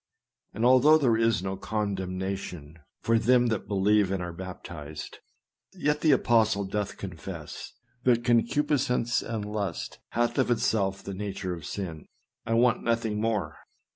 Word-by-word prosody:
And 110 +3 0
although 130 +5 +7
there 130 -7 +3
is 115 -5 +2
no 95 0 -2
condemnation 95 -6 -4 0.2
for 115 0 +3
them 125 +1 +4
that 110 -3 -2
believe 100 0 +3
and 95 0 -1
are 85 -1 -5
baptized, 85 -4 -8 0.5
yet 150 -5 0
the 160 - +3
apostle 110 -5 +3
doth 105 +1 -3
confess, 85 -3 -7 0.3
that 120 -2 +3
concupiscence 125 0 +2
and 110 -3 -4
lust 105 -5 -4
hath 120 +3 +1
of 130 - +2
itself 100 -5 +1
the 100 - -5
nature 95 -1 -4
of 85 -4 -7
sin." 85 -6 -5 0.4
I 115 - +1
want 120 +1 +3
nothing 115 -2 0
more. 110 -3 -1
105 Hz, 140 wpm, -27 LUFS, 95-120 Hz, 0.5 s, although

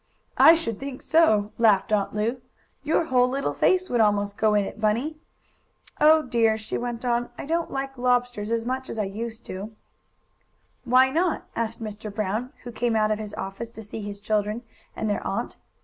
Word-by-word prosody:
"I 325 - +9
should 230 -10 -3
think 270 -1 -7
so!" 215 -11 +3
laughed 215 -3 +4
Aunt 205 0 0
Lu. 230 +4 -1 0.4
"Your 310 +3 +1
whole 250 -4 +3
little 275 +2 -1
face 370 0 +2
would 240 -6 +1
almost 205 -1 +2
go 215 0 +2
in 205 -1 +2
it, 215 - -8
Bunny. 240 +9 0 0.8
Oh 310 +1 +6
dear!" 230 -3 +2
she 220 - -6
went 240 0 -4
on. 240 0 0
"I - - -6
don't 330 +3 -1
like 270 -1 -4
lobsters 245 -3 +1
as 230 0 0
much 260 +1 -3
as - - -5
I 215 - +1
used 220 +3 -6
to." 200 +4 -7 1.1
"Why 255 +2 +5
not?" 335 +3 0
asked 230 0 -3
Mr. 215 0 -6
Brown, 215 +4 -2
who 245 - -7
came 235 0 -1
out 215 -1 +2
of 215 - 0
his 210 -1 -6
office 195 +4 -5
to 225 -1 -10
see 215 +1 -7
his 205 -1 -6
children 210 +2 -1 0.3
and 220 - -2
their 205 - 0
aunt. - - -3
230 Hz, 190 wpm, -25 LUFS, 210-255 Hz, 1.1 s, I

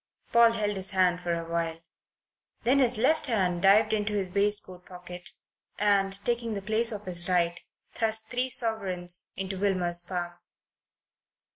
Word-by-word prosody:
Paul 235 -1 +6
held 210 -3 -1
his 190 0 -2
hand 180 -1 +2
for 175 -1 -2
a 165 0 -6
while. 165 -1 -3 0.8
Then 255 +4 +3
his 250 -3 +2
left 290 +7 +1
hand 185 -7 0
dived 210 +3 +4
into 210 0 -1
his 195 -3 -2
waistcoat 200 -2 +1
pocket 180 -1 -10 0.5
and, 200 -2 +2
taking 235 -2 -1
the 200 - -4
place 220 +3 +1
of 210 -1 -7
his 175 -1 -2
right, 175 -1 +1 0.3
thrust 220 -1 0
three 250 +1 -1
sovereigns 185 -7 +2
into 190 0 -4
Wilmer's 180 -3 0
palm. 175 -1 -5
195 Hz, 150 wpm, -27 LUFS, 180-220 Hz, 0.8 s, Paul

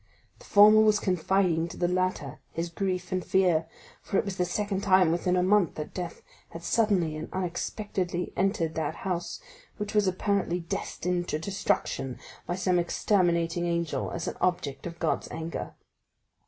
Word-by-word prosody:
The - - -15
former 210 +1 +7
was 215 -1 +4
confiding 180 -2 +1
to - - -9
the 175 - +1
latter 180 -6 -1
his 170 +1 -3
grief 185 0 -2
and 185 -1 0
fear, 175 -4 +2 0.3
for 195 - -1
it - - +1
was 195 -2 -4
the 180 - +1
second 200 0 -2
time 185 -4 +5
within 180 +2 +1
a 180 - +3
month 195 -1 +3
that 150 - -6
death 175 -2 -6 0.3
had 165 - -9
suddenly 190 -7 +2
and 155 +1 -6
unexpectedly 180 0 -3
entered 185 -4 0
that 160 0 -2
house 180 -2 -2 0.4
which 210 -1 -4
was 210 -2 +3
apparently 185 -1 0
destined 175 +1 -2
to - - -1
destruction 155 - -1 0.3
by 175 - -1
some 185 -1 +2
exterminating 175 -1 +1
angel, 170 -1 -1
as 170 -1 -4
an - - -4
object 150 -6 -1
of 170 0 -8
God's 165 -2 -1
anger." 165 +1 -5
180 Hz, 165 wpm, -28 LUFS, 170-195 Hz, 0.4 s, former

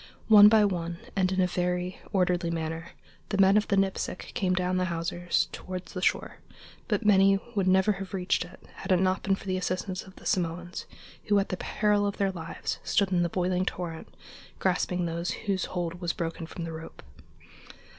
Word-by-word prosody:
One 210 -1 +10
by 215 -1 +5
one, 170 -3 -2 0.2
and 190 -1 +2
in 190 - 0
a 185 - +5
very 180 0 -2
orderly 180 -2 +1
manner, 165 0 -4 0.4
the 200 - -1
men 195 0 +6
of 210 0 +3
the 200 - +1
Nipsic 195 -1 -1
came 185 -2 +1
down 185 0 0
the 185 - +1
hawsers 175 0 -1
toward 185 -1 -6
the 185 - -7
shore, - - 0 0.5
but 235 - -1
many 195 -1 +6 0.2
would 195 -3 0
never 190 +2 +4
have 195 -1 -5
reached 185 -2 0
it, 175 - -14
had - - -4
it 185 - +5
not 185 0 +1
been 195 -1 +1
for - - -13
the 185 -1 -1
assistance 185 +1 -2
of 190 - -14
the - - -15
Samoans, 175 0 -2 0.4
who, 205 - +3
at 195 - +1
the 185 - -1
peril 205 0 +1
of 200 - -3
their 195 -1 +1
lives, 165 -3 -5
stood 200 -2 +1
in 180 -2 +3
the 170 - +1
boiling 180 +1 0
torrent, 175 -3 -4 0.5
grasping 180 -1 0
those 170 +1 -2 0.2
whose 195 -3 0
hold 175 0 -4
was 170 -1 -1
broken 165 -1 -4
from 170 - -7
the 165 -1 -5
rope. 160 +1 -9
185 Hz, 195 wpm, -28 LUFS, 175-195 Hz, 0.5 s, One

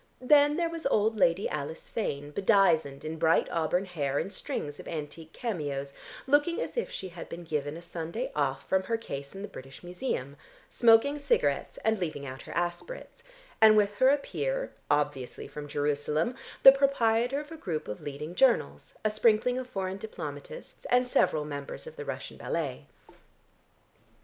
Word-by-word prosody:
Then 290 +3 +5
there 345 -1 +1
was 330 -3 -3
old 220 -3 +2
Lady 175 +2 +3
Alice 150 +1 -5
Fane 145 -9 -3
bedizened 160 -8 +3
in 160 +1 -4
bright 160 0 +3
auburn 170 +3 +1
hair 145 -7 -2
and 195 - -2
strings 145 -5 -4
of - - -9
antique 160 0 -6
cameos, 145 - -3 0.3
looking 290 +5 +3
as - - -4
if 475 - -1
she 190 - -5
had 170 -1 -9
been 170 +1 -7
given 150 -1 -3
a 170 - -10
Sunday 170 +7 -4
off 135 -2 -1
from 190 0 +3
her 230 +3 0
case 140 -9 -7
in 195 - -6
the - - -4
British 135 -8 -11
Museum, 175 - -4 0.3
smoking 240 +5 +5
cigarettes 145 - +1
and 220 -1 +2
leaving 155 -5 -3
out 130 0 -7
her - - -10
aspirates, 175 - -4 0.4
and 215 -1 +8
with 205 -1 +3
her 260 +3 +6
a 285 - +5
peer, - - -3 0.2
obviously 145 -3 -1
from 150 -1 -8
Jerusalem, 145 - 0 0.3
the 270 - +13
proprietor 270 -2 +2
of 295 +1 -9
a - - -6
group 170 - -4
of 105 - -6
leading 150 +3 -6
journals, 125 - +2
a 215 - +3
sprinkling 225 +3 +3
of 255 - -6
foreign 190 -2 -3
diplomatists, 150 -9 -8
and 250 +1 +3
several 155 -10 +2
members 145 - -6
of 475 0 -10
the 465 -2 -7
Russian - - -6
ballet. - - -3
180 Hz, 170 wpm, -29 LUFS, 145-240 Hz, 0.4 s, the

